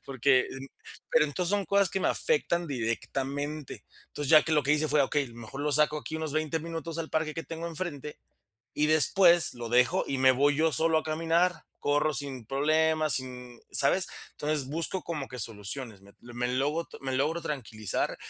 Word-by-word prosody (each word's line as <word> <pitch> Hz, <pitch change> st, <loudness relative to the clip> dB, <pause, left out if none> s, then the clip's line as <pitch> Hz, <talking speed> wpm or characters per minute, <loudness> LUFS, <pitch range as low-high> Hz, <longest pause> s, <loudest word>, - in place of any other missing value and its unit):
porque, 130 Hz, -1 st, +3 dB
en 135 Hz, +1 st, -8 dB, 0.4 s
pero -, -, +5 dB
entonces 170 Hz, +4 st, -1 dB
son 205 Hz, -1 st, +1 dB
cosas 200 Hz, -1 st, +2 dB
que -, -, -1 dB
me -, -, 0 dB
afectan 175 Hz, -, +1 dB
directamente, 140 Hz, +4 st, -3 dB, 0.2 s
entonces, 145 Hz, -2 st, -4 dB
ya 155 Hz, -2 st, +8 dB
que 160 Hz, -, -1 dB
lo 150 Hz, -2 st, +3 dB
que 145 Hz, -, +2 dB
hice 150 Hz, +1 st, +2 dB
fue: 150 Hz, -1 st, +4 dB
"Okey, 140 Hz, -2 st, -1 dB
mejor 115 Hz, +3 st, -9 dB
lo 150 Hz, +1 st, 0 dB
saco 150 Hz, +1 st, +3 dB
aquí 155 Hz, -, -7 dB
unos 160 Hz, -2 st, -3 dB
20 155 Hz, +1 st, -1 dB
minutos 165 Hz, 0 st, -5 dB
al 165 Hz, -1 st, -4 dB
parque 155 Hz, -1 st, -1 dB
que 165 Hz, -, -4 dB
tengo 165 Hz, +3 st, -6 dB
enfrente 155 Hz, -4 st, -5 dB, 0.6 s
y 150 Hz, -, +2 dB
después 170 Hz, +3 st, +4 dB
lo 120 Hz, -1 st, -6 dB
dejo 125 Hz, +2 st, +3 dB
y 135 Hz, -, -1 dB
me 130 Hz, 0 st, +6 dB
voy 145 Hz, +3 st, +2 dB
yo 160 Hz, 0 st, +2 dB
solo 160 Hz, +4 st, +3 dB
a -, -, -3 dB
caminar, 165 Hz, +2 st, 0 dB
corro 145 Hz, +1 st, +1 dB
sin 135 Hz, -3 st, -3 dB
problemas, 155 Hz, +2 st, +2 dB
sin", 125 Hz, -2 st, -5 dB
¿sabes? 175 Hz, +7 st, +1 dB, 0.2 s
Entonces 150 Hz, -2 st, -2 dB
busco 165 Hz, +5 st, -2 dB
como 150 Hz, -5 st, -5 dB
que 125 Hz, -, -8 dB
soluciones, 110 Hz, 0 st, -4 dB
me 100 Hz, +1 st, -18 dB
me 120 Hz, 0 st, -4 dB
logo 145 Hz, +6 st, -1 dB
me 135 Hz, -1 st, -3 dB
logro 155 Hz, +6 st, 0 dB
tranquilizar, 115 Hz, -, -2 dB
150 Hz, 185 wpm, -28 LUFS, 130-160 Hz, 0.6 s, ya